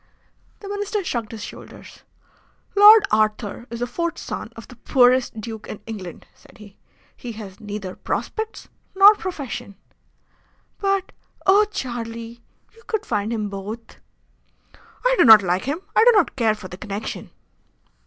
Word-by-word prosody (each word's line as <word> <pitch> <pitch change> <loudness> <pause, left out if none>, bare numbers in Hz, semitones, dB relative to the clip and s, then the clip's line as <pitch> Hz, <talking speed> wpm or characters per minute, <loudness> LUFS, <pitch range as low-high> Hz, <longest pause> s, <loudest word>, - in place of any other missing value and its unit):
The 405 - -9
Minister 410 0 -3
shrugged 235 -9 -3
his 220 -2 -7
shoulders. - - -11 0.7
"Lord 415 +1 +9
Arthur 215 +2 0
is 235 +1 -7
the - - +1
fourth 340 +8 -3
son - - -6
of - - -11
the - - -13
poorest 250 -3 +2
duke 220 0 -7
in - - -7
England," 195 -7 -8
said - - -20
he. 205 -2 -15 0.4
"He 240 -2 -8
has 205 -3 -10
neither 205 -3 -6
prospects 440 0 -4 0.3
nor 395 +2 +9
profession." 265 - -6 1.0
"But, 390 -1 0 0.3
oh! 400 +2 +6
Charlie, 235 - -6 0.3
you 455 - -20
could 430 -2 -2
find 210 0 -2
him 215 -3 -2
both." 205 +3 -8 1.1
"I - - +4
do - - +8
not 220 -3 +9
like 180 +1 0
him. 295 +6 -3
I - - +6
do 485 - +7
not 410 -6 +2
care 225 -4 +2
for 200 - -10
the 180 - -10
connection." 205 +2 -6
235 Hz, 150 wpm, -22 LUFS, -, 1.1 s, Lord